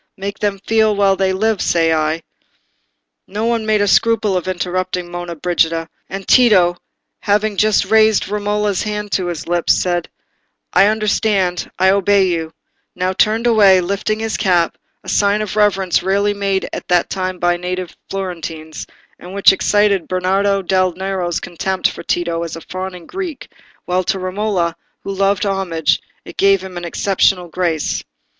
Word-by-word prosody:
—make 195 +1 -5
them 205 -1 -1
feel 220 -1 +2
while 200 -1 +3
they 190 0 +1
live, 215 +1 0
say 165 -1 +2
I—" 155 +1 -1 1.0
No 210 +3 -3
one 230 -2 0
made 215 -1 +2
a - - 0
scruple 220 -1 +2
of 180 -1 -2
interrupting 180 -1 -3
Monna 175 -1 -5
Brigida, 165 0 0 0.2
and 195 0 -6
Tito, 190 -8 +5 0.4
having 210 0 0
just 210 +1 +2
raised 220 +1 +3
Romola's 205 -1 -1
hand 210 -1 -4
to 185 -2 0
his 170 -4 -5
lips, 175 0 +2
and - - 0
said, 175 -2 -1 0.6
"I 200 - +5
understand, 210 -4 0
I 190 +1 +4
obey 200 -1 +3
you," 165 -2 -2 0.4
now 185 +1 -1
turned 220 +4 +1
away, 205 -5 +5
lifting 200 +4 -1
his 225 -1 -2
cap—a 175 -3 -1
sign 205 0 +2
of 215 -2 -4
reverence 195 -4 +2
rarely 200 +2 +1
made 195 -1 -1
at - - -6
that 175 -1 +1
time 185 -1 -3
by 175 0 +1
native 180 0 -5
Florentines, 165 -5 -6 0.3
and 180 +2 -10
which 200 -1 +6
excited 205 -1 +2
Bernardo 195 +2 +1
del 185 0 +1
Nero's 185 -1 -2
contempt 185 +2 -1
for - - -7
Tito 170 -1 -1
as 170 -1 -5
a 165 - -8
fawning 185 0 -7
Greek, 365 -7 -6 0.4
while 180 +1 0
to 195 - 0
Romola, 185 -2 -1 0.3
who 195 - -4
loved 195 +1 +1
homage, 185 -6 0 0.2
it - - -11
gave 195 -1 +3
him 190 -1 -9
an 175 0 -5
exceptional 180 0 +1
grace. 165 -3 -1
190 Hz, 160 wpm, -17 LUFS, 175-205 Hz, 1.0 s, which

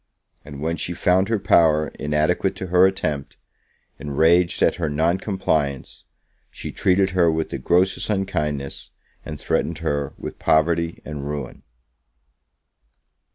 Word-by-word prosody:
And, 70 -1 -10
when 80 +2 -1
she 85 - -4
found 95 +4 +2
her 115 - +2
power 80 -6 +3
inadequate 75 +7 0
to - - -5
her 90 +1 +7
attempt, 75 -7 -3 0.6
enraged 80 +5 +2
at - - +2
her 80 -3 -1
non 80 +5 +1
compliance, 80 -10 -2 0.4
she - - -8
treated 95 +1 +2
her 90 -2 +3
with 80 0 -2
the 70 - -4
grossest 90 +9 +1
unkindness, 75 -9 -2 0.3
and 75 -2 -7
threatened 85 - -1
her 70 -2 -2
with - - -8
poverty 85 +1 +1
and 75 -2 -6
ruin. 70 -4 -6
80 Hz, 130 wpm, -22 LUFS, 75-90 Hz, 0.6 s, her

